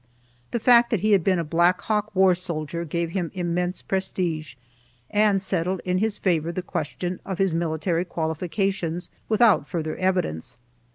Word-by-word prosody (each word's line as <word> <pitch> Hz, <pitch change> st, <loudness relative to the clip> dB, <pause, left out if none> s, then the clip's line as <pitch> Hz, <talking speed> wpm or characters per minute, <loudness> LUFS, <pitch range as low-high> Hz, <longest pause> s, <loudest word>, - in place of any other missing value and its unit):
The 235 Hz, -, -1 dB
fact 235 Hz, +1 st, +6 dB
that 220 Hz, -6 st, 0 dB
he 215 Hz, -, +2 dB
had 195 Hz, -4 st, +4 dB
been 185 Hz, 0 st, +2 dB
a 170 Hz, -, 0 dB
Black 170 Hz, +3 st, +2 dB
Hawk 210 Hz, -1 st, -1 dB
war 190 Hz, -1 st, +5 dB
soldier 170 Hz, -2 st, -4 dB
gave 170 Hz, +1 st, -2 dB
him 175 Hz, -3 st, -2 dB
immense 180 Hz, 0 st, -1 dB
prestige, 175 Hz, -6 st, -2 dB, 0.6 s
and 210 Hz, -1 st, +3 dB
settled 185 Hz, -1 st, 0 dB
in 180 Hz, 0 st, +1 dB
his 215 Hz, 0 st, 0 dB
favor 170 Hz, -3 st, 0 dB
the 180 Hz, +1 st, -4 dB
question 175 Hz, +3 st, -4 dB
of 190 Hz, -, -4 dB
his 195 Hz, -3 st, +1 dB
military 165 Hz, +1 st, 0 dB
qualifications 175 Hz, +1 st, -2 dB, 0.2 s
without 215 Hz, -9 st, +4 dB
further 155 Hz, -2 st, -3 dB
evidence. 125 Hz, -, -1 dB
180 Hz, 160 wpm, -24 LUFS, 165-195 Hz, 0.6 s, fact